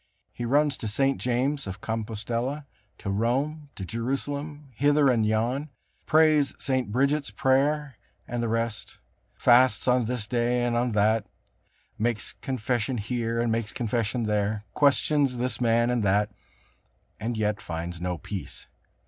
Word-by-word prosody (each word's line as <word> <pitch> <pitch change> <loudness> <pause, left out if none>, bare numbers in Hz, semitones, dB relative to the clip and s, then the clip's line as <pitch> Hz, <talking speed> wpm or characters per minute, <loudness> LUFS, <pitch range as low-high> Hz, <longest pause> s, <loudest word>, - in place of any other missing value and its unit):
He 120 - -4
runs 145 +3 +2
to 110 - -5
St. 135 +6 +1
James 130 +2 0
of 95 +1 -6
Compostella, 115 +6 -3 0.3
to 100 - -4
Rome, 135 +8 -1
to 95 - -6
Jerusalem, 140 - -4
hither 145 +3 +3
and 120 -3 +3
yon, 120 +7 0 0.4
prays 155 -3 +4
St. 130 -5 -1
Bridget's 140 +4 +1
prayer 140 +1 +1 0.3
and 120 0 -2
the 115 - 0
rest, 115 -1 -2 0.4
fasts 125 +2 +4
on 125 -1 +3
this 120 -2 -2
day 120 +1 +1
and 120 -1 0
on 120 0 +1
that, 105 0 +2 0.7
makes 115 0 -1
confession 125 -1 -2
here, 115 +1 -2
and 120 -1 +1
makes 115 -1 -1
confession 115 0 -1
there, 105 0 0
questions 140 -2 +3
this 125 +1 -1
man 120 0 +3
and 120 -2 +1
that, 105 +1 +2 0.9
and 115 +1 -3
yet 105 -1 0
finds 85 +1 -5
no 90 -1 -2
peace. 95 +4 -7
120 Hz, 140 wpm, -26 LUFS, 110-135 Hz, 0.9 s, prays